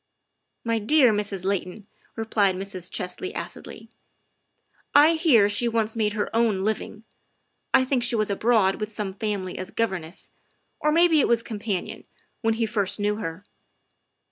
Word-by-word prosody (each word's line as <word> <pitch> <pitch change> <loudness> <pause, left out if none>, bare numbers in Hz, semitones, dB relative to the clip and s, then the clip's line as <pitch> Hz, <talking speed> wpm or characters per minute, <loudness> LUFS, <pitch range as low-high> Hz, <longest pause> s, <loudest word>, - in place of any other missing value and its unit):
' - - -53
' - - -53
My 225 - +1
dear 250 +1 +4
Mrs. 200 -3 -3
Layton, 195 +1 -3
' - - -35
' - - -40
replied 210 -4 +1
Mrs. 185 -2 -4
Chesley 180 - -4
acidly, - - -8 0.6
" - - -37
I 325 - +4
hear 300 - +4
she 205 +4 +1
once 225 -1 0
made 210 -2 0
her 210 +1 -3
own 220 -5 +2
living. 215 +1 -3 0.7
I 260 - +4
think 260 -1 0
she 240 0 +1
was 215 -2 0
abroad 205 -2 +2
with 215 0 -4
some 205 -3 -4
family 195 -3 -4
as 185 0 -6
governess, 190 -7 -4 0.5
or 300 - +1
maybe 330 0 +4
it - - +3
was 235 -1 +2
companion, 205 -5 -4 0.4
when 225 -1 +1
he 225 0 0
first 205 -2 0
knew 210 0 0
her." 165 -2 -6
215 Hz, 170 wpm, -24 LUFS, 195-230 Hz, 0.7 s, dear